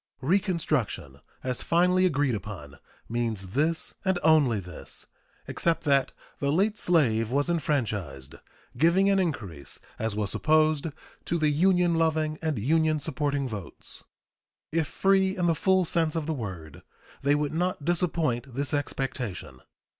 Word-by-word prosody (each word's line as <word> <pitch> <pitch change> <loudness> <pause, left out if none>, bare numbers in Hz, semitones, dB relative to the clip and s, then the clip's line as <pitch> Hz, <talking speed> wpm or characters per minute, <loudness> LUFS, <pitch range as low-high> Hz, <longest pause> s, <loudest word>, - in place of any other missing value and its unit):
Reconstruction, 155 - 0 0.2
as 125 -2 -2
finally 180 +2 +3
agreed 145 -5 +1
upon, 90 -9 -7 0.3
means 110 -5 -2
this 155 +7 0
and 190 -2 +1
only 145 -9 +4
this, 90 -4 -7 0.4
except 170 -1 0
that 140 -3 +2 0.3
the 140 0 0
late 205 +7 +1
slave 115 -11 +2
was 145 +6 +1
enfranchised, 105 - -2 0.4
giving 185 +5 +4
an 195 - +3
increase, 105 - -4 0.2
as 110 -1 -2
was 105 -1 0
supposed, 155 -1 +2 0.4
to 170 - 0
the 155 -2 +2
Union 180 +2 +3
loving 160 -1 0
and 160 -4 -1
Union 155 +7 +2
supporting 145 -2 -1
votes. 105 -7 -7 0.7
If 160 -1 0
free 190 +2 +2
in 180 - 0
the 170 - +3
full 190 +3 +2
sense 165 -1 +1
of 160 -2 -1
the 160 - -1
word, 95 - -7 0.4
they 140 +1 +3
would 145 0 -1
not 175 -3 -1
disappoint 155 -8 0
this 140 +2 -2
expectation. 135 - -3
150 Hz, 140 wpm, -27 LUFS, 120-170 Hz, 0.7 s, only